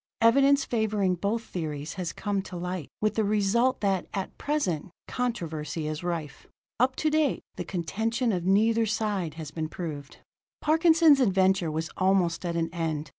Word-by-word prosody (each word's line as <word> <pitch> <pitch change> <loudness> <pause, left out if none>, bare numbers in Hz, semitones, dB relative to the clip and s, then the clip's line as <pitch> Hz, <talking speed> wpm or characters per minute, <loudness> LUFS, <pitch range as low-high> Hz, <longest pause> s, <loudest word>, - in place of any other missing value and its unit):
Evidence 275 +5 +5
favoring 215 -5 +1
both 205 +6 -1
theories 155 -6 -5
has 180 -3 -3
come 205 -2 -2
to 185 - -9
light, 180 -2 -4
with 215 0 +2
the 220 - +1
result 215 +5 +2
that, 195 -3 0
at 195 -1 -4
present, 190 - -1 0.2
controversy 165 -11 -3
is 155 +2 -4
rife. 165 -5 -4 0.3
Up 260 +2 +3
to 310 - 0
date, 305 -3 +1
the 180 - -4
contention 220 +8 -1
of 180 -4 -1
neither 220 +4 +3
side 205 -7 -1
has 155 -2 -7
been 155 0 -4
proved.] 155 -5 -6 0.4
Parkinson's 320 -1 +5
adventure 190 -6 +3
was 160 +1 -3
almost 185 -3 +2
at 170 - -2
an 165 -1 -1
end. 160 -3 -2
190 Hz, 160 wpm, -27 LUFS, 165-230 Hz, 0.4 s, Evidence